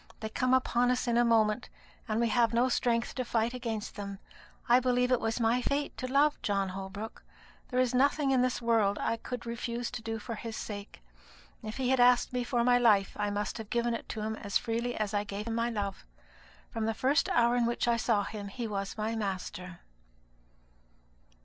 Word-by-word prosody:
They 220 - -4
come 255 +3 +2
upon 245 -1 +2
us 250 +1 0
in 235 - +2
a 240 - +5
moment, 225 0 +2 0.4
and 215 -1 0
we 235 -1 +2
have 230 -1 +2
no 245 +2 +3
strength 235 -1 0
to 255 - -2
fight 235 0 0
against 230 -4 -4
them. 200 -1 -6 0.5
I 245 0 +6
believe 250 0 +1
it 250 - +4
was 225 +1 -1
my 235 +2 +2
fate 285 +3 -1
to 255 0 -4
love 290 +2 +3
John 195 -2 0
Holbrook. 195 +3 -7 0.5
There 255 - 0
is 255 -1 +2
nothing 280 +2 +3
in 260 -2 +4
this 250 -1 0
world 220 -4 +2
I 230 - -1
could 245 +1 -6
refuse 235 0 -3
to 245 -2 -5
do 225 0 -3
for 225 +2 -6
his 225 0 -6
sake. 205 - -7 0.6
If 220 +2 -6
he 260 -2 0
had 265 -1 +3
asked 245 0 +5
me 250 0 0
for 240 -1 0
my 245 0 +4
life, 210 -5 +3
I 205 - -1
must 205 +2 -3
have 220 -2 -7
given 235 0 0
it 230 - -5
to 220 - -4
him 220 +1 -2
as 200 -1 0
freely 235 +1 -2
as 215 -1 -2
I 205 0 +1
gave 205 0 -5
him 230 - -3
my 230 +1 0
love. 200 -4 -3 0.7
From 225 -2 -2
the 225 - -1
first 280 +4 +2
hour 235 0 +3
in 240 -1 +2
which 235 0 -1
I 235 -1 +3
saw 220 -3 +1
him 205 0 -6
he 230 +4 -5
was 200 -1 -4
my 220 +1 -1
master.'" 180 -4 -4
230 Hz, 215 wpm, -30 LUFS, 215-245 Hz, 0.7 s, I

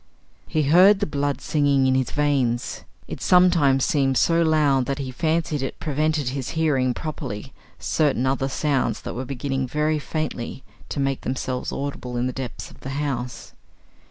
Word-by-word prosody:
He 155 - 0
heard 185 +8 +6
the 205 - +1
blood 145 -1 -2
singing 140 -3 +2
in 130 - +3
his 130 -2 +1
veins. 135 -5 0 0.2
It - - -7
sometimes 170 -7 +4
seemed 135 -3 +2
so 170 0 +3
loud 150 -5 +3
that 140 - -1
he 135 -2 -4
fancied 155 +1 0
it 135 - -4
prevented 155 -2 0
his 130 -1 -4
hearing 135 -6 +2
properly 135 -6 -6 0.2
certain 140 -5 +1
other 135 0 0
sounds 140 -1 0
that - - -5
were 130 +2 -4
beginning 135 0 -2
very 150 +3 0
faintly 140 -5 -4 0.3
to - - -4
make 135 -1 0
themselves 130 0 -3
audible 135 -3 -4
in 120 - 0
the 130 - -2
depths 130 -2 -6
of - - -17
the 135 - -7
house. 130 -4 -4
140 Hz, 165 wpm, -23 LUFS, 130-155 Hz, 0.3 s, heard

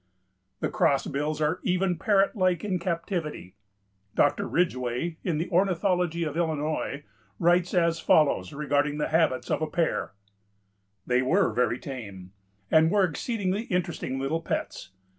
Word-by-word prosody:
The - - 0
Crossbills 150 +2 0
are 155 +4 +1
even 180 0 +1
parrot 200 -1 +2
like 185 -4 +1
in 190 -3 -1
captivity. 165 - -3 0.6
Dr. 145 - +2
Ridgway, 160 -1 -1
in 170 -4 -1
the 165 - -2
"Ornithology 180 -2 +1
of 155 -2 -3
Illinois," 155 -3 -2 0.3
writes 175 +1 +2
as 170 -2 +2
follows 145 - +3
regarding 145 0 0
the 150 - -1
habits 160 -5 +1
of - - 0
a 155 - 0
pair: 160 -8 -1 0.9
"They 125 0 +2
were 160 - +2
very 120 +1 +1
tame, 100 -10 -8 0.4
and 160 0 +5
were 205 +2 +3
exceedingly 200 +3 -1
interesting 175 - -2
little 145 +5 -1
pets. 95 - -4
160 Hz, 135 wpm, -27 LUFS, 145-180 Hz, 0.9 s, and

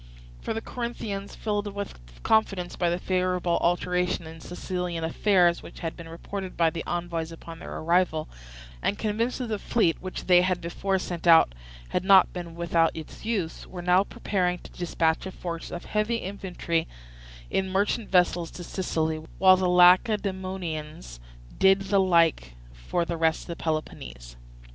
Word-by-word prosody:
For 225 - -3
the 225 - -2
Corinthians, 220 -5 -5
filled 205 -1 -2
with 200 - -5 0.2
confidence 195 -5 +1
by 175 - +1
the 175 - 0
favourable 180 -1 0
alteration 180 0 0
in 160 0 -10
Sicilian 180 -1 -4
affairs 175 +1 +3
which - - -12
had 165 -2 -3
been 165 -1 -10
reported 190 +3 -6
by 165 -1 +3
the 165 - -5
envoys 170 -2 -3
upon 165 0 -10
their - - -7
arrival, 170 -2 +1 0.5
and 205 - 0
convinced 225 +3 -1
that 255 - -3
the 215 -2 -2
fleet 185 -8 +1
which 185 0 -6
they 180 -1 +6
had 185 -1 +1
before 190 +3 -1
sent 175 -2 -4
out 165 - +7 0.4
had - - -1
not 190 -1 +6
been 170 -2 -7
without 170 -1 +2
its 160 +6 -9
use, 200 -8 -2
were 180 -2 -8
now 180 +2 +4
preparing 180 -3 -1
to - - -12
dispatch 165 0 0
a - - -6
force 170 -2 -6
of 175 - -7
heavy 215 +2 0
infantry 185 -5 -2 0.6
in 190 0 0
merchant 200 +3 0
vessels 175 -2 +2
to 175 - -9
Sicily, 160 -3 -1 0.2
while 190 -1 +7
the 185 -1 +1
Lacedaemonians 180 - +2 0.4
did 195 0 +6
the 195 0 +2
like 165 - +3 0.2
for - - -2
the 170 0 -3
rest 160 -1 +1
of 170 - -3
Peloponnese. 65 - -4
180 Hz, 160 wpm, -26 LUFS, 165-195 Hz, 0.6 s, out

